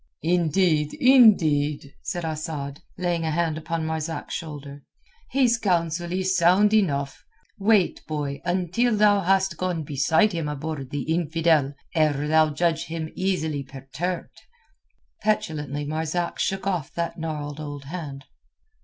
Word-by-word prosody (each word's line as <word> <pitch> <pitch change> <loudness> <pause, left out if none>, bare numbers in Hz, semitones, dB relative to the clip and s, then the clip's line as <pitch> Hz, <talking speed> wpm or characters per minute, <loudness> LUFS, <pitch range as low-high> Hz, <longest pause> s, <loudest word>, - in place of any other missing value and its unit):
"Indeed, 165 -2 +2
indeed," 160 - +4
said 175 -3 -4
Asad, 155 -3 -4 0.2
laying 175 -2 -1
a 160 - 0
hand 165 0 0
upon 160 +1 -3
Marzak's 160 -1 -4
shoulder, 145 -3 -7 0.5
"his 245 -3 +3
counsel 175 -3 0
is 185 +1 0
sound 185 +4 +4
enough. 140 -10 +1 0.4
Wait, 200 -2 +2
boy, 145 -2 -3
until 185 +6 +1
thou 205 -1 +5
hast 190 -1 +2
gone 180 -3 -2
beside 150 +9 +2
him 165 -3 -2
aboard 150 -2 -5
the 145 -1 -3
infidel, 160 -3 +1 0.2
ere 150 -3 +1
thou 155 0 +4
judge 160 +2 0
him 160 -1 -5
easily 160 -6 -1
perturbed." 140 +7 -5 0.8
Petulantly 155 -9 -1
Marzak 160 +3 -2
shook 195 0 -1
off 180 -7 -1
that 170 0 -3
gnarled 150 -2 -4
old 145 -2 -6
hand. 140 -3 -7
160 Hz, 125 wpm, -24 LUFS, 150-185 Hz, 0.8 s, thou